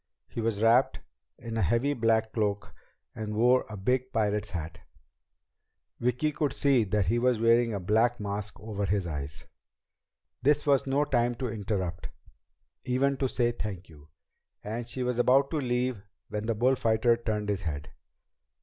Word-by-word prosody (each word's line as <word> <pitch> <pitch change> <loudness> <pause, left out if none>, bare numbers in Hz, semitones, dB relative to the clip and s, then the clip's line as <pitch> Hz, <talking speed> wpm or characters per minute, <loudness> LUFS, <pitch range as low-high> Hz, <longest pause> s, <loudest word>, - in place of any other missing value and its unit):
He 115 - -5
was 110 -1 -1
wrapped 120 +4 +4 0.4
in 115 -1 -6
a - - +1
heavy 120 - +2
black 110 -3 +1
cloak 105 -2 -1 0.4
and 105 -1 -5
wore 125 +3 +3
a 105 - -7
big 125 +6 0
pirate's 105 -2 0
hat. 80 -3 -6 1.2
Vicki 125 +5 0
could 145 -1 -1
see 135 -5 +3
that 100 0 0
he 115 +7 +1
was 125 -2 +2
wearing 115 +1 +4
a 100 - -2
black 110 +6 +2
mask 100 0 -4
over 105 -2 -3
his 100 -1 0
eyes. 75 -3 -5 1.0
This 145 +3 +2
was 140 -2 +3
no 140 +2 +2
time 120 -3 +1
to 125 0 -3
interrupt, 95 -6 -3 0.7
even 135 +2 +1
to 135 -1 0
say 120 -1 +1
"Thank 100 -6 -6
you," 75 -1 -16 0.5
and 115 +3 -4
she 125 +1 -4
was 125 -1 -1
about 135 +3 +4
to 160 - -1
leave 125 -4 -1 0.3
when 105 +1 -4
the 115 - 0
bullfighter 115 -1 +3
turned 105 -3 -3
his 100 -2 -1
head. 75 -5 -5
115 Hz, 160 wpm, -28 LUFS, 105-125 Hz, 1.2 s, wrapped